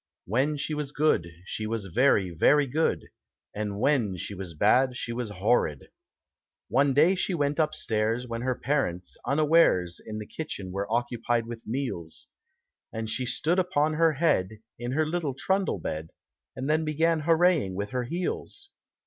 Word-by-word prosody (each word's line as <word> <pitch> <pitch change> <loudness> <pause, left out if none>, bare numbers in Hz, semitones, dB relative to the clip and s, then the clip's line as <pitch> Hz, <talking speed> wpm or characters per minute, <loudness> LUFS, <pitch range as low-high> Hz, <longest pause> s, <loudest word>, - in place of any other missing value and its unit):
When 135 - +1
she 150 +2 -3
was 150 -2 -3
good 150 - +2 0.2
She 110 +2 -4
was 110 -2 -2
very, 95 -1 +2
very 145 - +4
good, 150 +5 -1 0.4
And 105 -1 -3
when 115 -8 +1
she 100 - -5
was 90 -4 -7
bad 125 - +3
she 120 - -4
was 120 -2 -3
horrid. 100 - 0 0.8
die 140 +1 +4
day 155 +7 +5
she 185 -1 -1
went 145 0 0
upstairs, 115 -6 0
When 115 0 -4
her 130 0 0
parents, 120 -12 -1
unawares. 145 - +3
In 110 -1 -6
the 105 - -5
kitchen 105 -10 -6
were 100 +3 -3
occupied 120 0 0
with 115 0 -9
meals, 110 -10 -4 0.6
And 110 -1 -4
she 125 +3 -1
stood 160 +8 +1
upon 155 -4 +1
her 165 0 +3
head 135 - +2 0.3
In 120 +1 -3
her 155 +2 +2
little 155 -4 -2
trundle 190 - 0
bed. 80 -2 -5 0.5
And 130 +1 -4
then 155 +1 +2
began 160 +2 +1
hooraying 165 - +3
with 100 +3 -4
her 125 -1 -1
heels. 185 - -4
125 Hz, 160 wpm, -27 LUFS, 105-155 Hz, 0.8 s, day